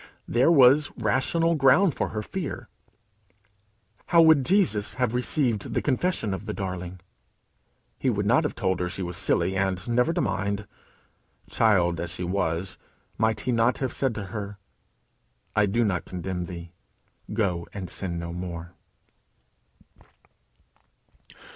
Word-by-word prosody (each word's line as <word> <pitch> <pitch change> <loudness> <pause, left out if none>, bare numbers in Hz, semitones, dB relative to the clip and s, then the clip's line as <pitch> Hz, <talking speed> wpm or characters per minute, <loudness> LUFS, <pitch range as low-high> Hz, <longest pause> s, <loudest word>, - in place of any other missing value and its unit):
There 125 +7 +3
was 140 0 +6
rational 135 +8 +1
ground 155 +4 +4
for - - -2
her 105 -1 -4
fear. 175 - -5 1.4
How 170 - +4
would 160 -4 +6
Jesus 135 - +2
have 125 -2 0
received 125 -3 0
the - - +1
confession 135 - 0
of 95 +3 -6
the 105 - -3
darling? 90 -2 -5 1.0
He 130 - +1
would 105 -3 -1
not 120 +9 +4
have 150 - -2
told 95 -5 0
her 90 0 -1
she 95 +1 -4
was 90 0 -5
silly, 95 - +1
and 95 0 -1
"never 125 +6 +2
to - - -1
mind." 100 +1 -1 0.9
Child 90 -7 +3
as 85 0 -3
she 90 +1 -4
was, 90 0 -2 0.4
might 110 -1 +1
he 125 - -1
not 115 +1 +2
have 130 -2 -2
said 130 -5 0
to 105 - -4
her, 100 -2 -5 1.0
"I 105 -1 +4
do 115 +4 +1
not 90 -5 -1
condemn 90 0 -4
thee: 85 -1 -8 0.6
go 95 -6 -1
and 95 -3 -6
sin 85 -2 -4
no 85 0 -5
more"? 85 -1 -6
105 Hz, 140 wpm, -26 LUFS, 90-125 Hz, 1.4 s, was